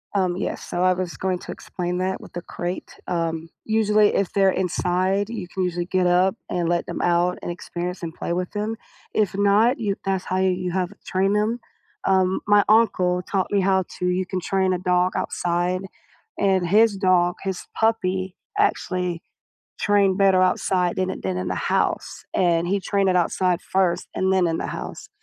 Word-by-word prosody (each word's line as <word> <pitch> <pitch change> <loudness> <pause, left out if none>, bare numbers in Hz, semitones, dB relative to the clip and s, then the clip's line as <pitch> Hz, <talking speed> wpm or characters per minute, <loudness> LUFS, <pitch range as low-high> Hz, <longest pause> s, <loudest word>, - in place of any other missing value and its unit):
Um, 185 -2 +1
yes, - - -3
so 175 +1 -2
I 185 0 +5
was 180 -1 -4
going 185 -1 -1
to - - -8
explain 180 -1 -4
that 185 +1 -2
with - - -13
the 175 0 -5
crate, 175 +1 -6
um, 165 -2 -2 0.2
usually, 215 -1 +3
if 195 - 0
they're 195 -1 +4
inside, 185 +2 0
you 215 -6 -5
can 185 +1 -3
usually 175 -1 -2
get 185 -1 +1
up 180 +3 +3 0.2
and 175 -1 0
let 175 0 +1
them 175 - -4
out 175 +1 +2
and - - -5
experience 180 +1 -5
and 165 -1 -4
play 170 - -4
with 180 +1 -2
them. 210 +2 -2 0.4
If 200 -3 +1
not, 205 +5 +3
you 200 -3 -1
that's 190 -1 -1
how 185 - -1
you 185 -1 +1
have 185 0 -1
train 195 +2 +1
them, 215 +3 +1 0.5
um, 190 -1 +2
my 205 0 +5
uncle 185 -5 +3
taught 190 -1 -1
me 205 - +3
how 190 -1 +2
to, 180 - -2
you 185 +1 0
can 185 - -2
train 190 +1 +1
a - - 0
dog 180 0 +1
outside, 175 +1 -1 0.6
and 190 -3 +2
his 215 +2 +4
dog, 185 -2 +3
his 190 -2 -4
puppy, 190 -4 0 0.2
actually 180 - 0 0.6
trained 200 -2 +3
better 190 -2 +5
outside 180 -1 +1
than 185 0 0
it - - -5
did 95 -1 -2
in 90 - -3
the - - -1
house, - - -1
and 170 -2 +2
he 195 +2 0
trained 195 0 +1
it 185 - +2
outside 180 +1 +1
first 185 -2 0
and 190 0 +1
then 180 -2 +3
in 165 - -1
the - - -3
house, - - -7
185 Hz, 190 wpm, -23 LUFS, 180-195 Hz, 0.6 s, I